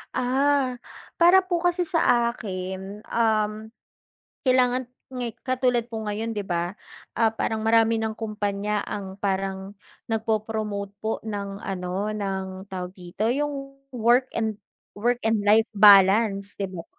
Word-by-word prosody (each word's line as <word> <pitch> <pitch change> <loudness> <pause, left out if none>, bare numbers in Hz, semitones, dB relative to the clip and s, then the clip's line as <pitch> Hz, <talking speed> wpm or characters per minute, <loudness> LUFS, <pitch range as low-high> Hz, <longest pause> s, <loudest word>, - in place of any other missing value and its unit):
Ah, 260 0 +1 0.4
para 370 +2 +7
po 350 -2 -1
kasi 355 0 +1
sa 245 -8 +2
akin, 190 -1 -6
um, 215 -1 0 0.8
kailangan 255 -1 +3 0.3
nga'y 240 -2 -3
katulad 250 -2 +1
po 220 -2 -5
ngayon 215 +2 -3
'di 205 - -2
ba, 175 +1 -2 0.4
ah, 225 -1 +3
parang 220 0 -2
marami 225 0 +4
ng 220 0 -1
kumpanya 210 -1 -2
ang 195 -2 -6
parang 195 -1 -2 0.4
nagpo-promote 215 -2 -2
po 220 - -2
ng 200 -2 -5
ano 190 +2 -3
ng 190 -1 -4
tawag 180 -1 -5
dito? 180 +3 -5
Yung 275 -1 -4
work 245 +1 +2
and 220 -2 -2 0.3
work 240 +4 0
and 220 -1 +2
life 215 +2 +4
balance 200 0 +6
'di 195 - -1
ba? 165 - -6
215 Hz, 130 wpm, -25 LUFS, 200-240 Hz, 0.8 s, para